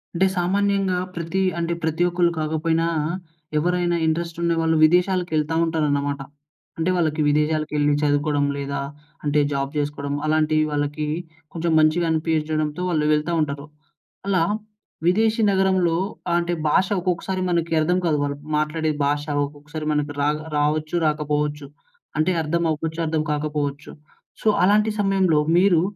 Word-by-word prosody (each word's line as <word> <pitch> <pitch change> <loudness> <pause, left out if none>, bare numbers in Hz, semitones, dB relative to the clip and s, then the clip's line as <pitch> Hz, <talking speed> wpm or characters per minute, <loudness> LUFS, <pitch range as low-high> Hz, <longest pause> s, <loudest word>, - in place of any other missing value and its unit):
అంటే 190 +2 +3
సామాన్యంగా 195 0 +1 0.2
ప్రతి 170 +2 -2 0.2
అంటే 170 0 -1
ప్రతి 160 +2 0
ఒక్కళ్ళు 175 0 +2
కాకపోయినా 160 +1 0 0.7
ఎవరైనా 175 +2 +1
ఇంట్రెస్ట్ 165 +1 -1
ఉండేవాళ్ళు 165 -1 +1
విదేశాలకెళ్తా 175 -2 +2
ఉంటారన్నమాట. 145 -3 0 0.6
అంటే 165 +2 0
వాళ్ళకి 160 -3 0
విదేశాలకెళ్లి 150 0 +1
చదువుకోవడం, 145 0 +1
లేదా 140 0 -3 0.4
అంటే 150 0 +2
జాబ్ 140 0 -2
చేసుకోవడం 145 -1 -2
అలాంటివి 155 0 +2
వాళ్ళకి 145 +1 -2 0.5
కొంచెం 170 0 -1
మంచిగా 155 +3 +3
అనిపించడంతో 155 0 -1
వాళ్ళు 155 -3 +1
వెళ్తా 150 +3 0
ఉంటారు. 140 -1 -3 0.6
అలా 185 -4 +2 0.6
విదేశీ 220 +5 +3
నగరంలో 190 -3 +2 0.3
ఆహ్, 170 - +3
అంటే 175 0 -1 0.2
భాష 190 +5 +3
ఒకొక్కసారి 185 +1 -2
మనకి 170 -1 0
అర్థం 175 +3 +2
కాదు. 155 -3 +2
వాళ్ళు 140 0 -2 0.2
మాట్లాడే 155 +1 0
భాష 145 +1 0 0.2
ఒకొక్కసారి 150 +2 -8
మనకి 150 -1 -1
రా 145 - +3 0.3
రావచ్చు, 155 +2 0
రాకపోవచ్చు. 150 -1 -1 0.5
అంటే 155 +4 +2
అర్థం 170 +2 -1
అవ్వచ్చు, 160 +1 -3
అర్థం 155 -1 0
కాకపోవచ్చు. 150 -1 -3 0.5
సో - - -2 0.2
అలాంటి 210 +3 +4
సమయంలో 190 -5 +3 0.2
మీరు 180 -3 +4
155 Hz, 125 wpm, -22 LUFS, 150-175 Hz, 0.7 s, అలాంటి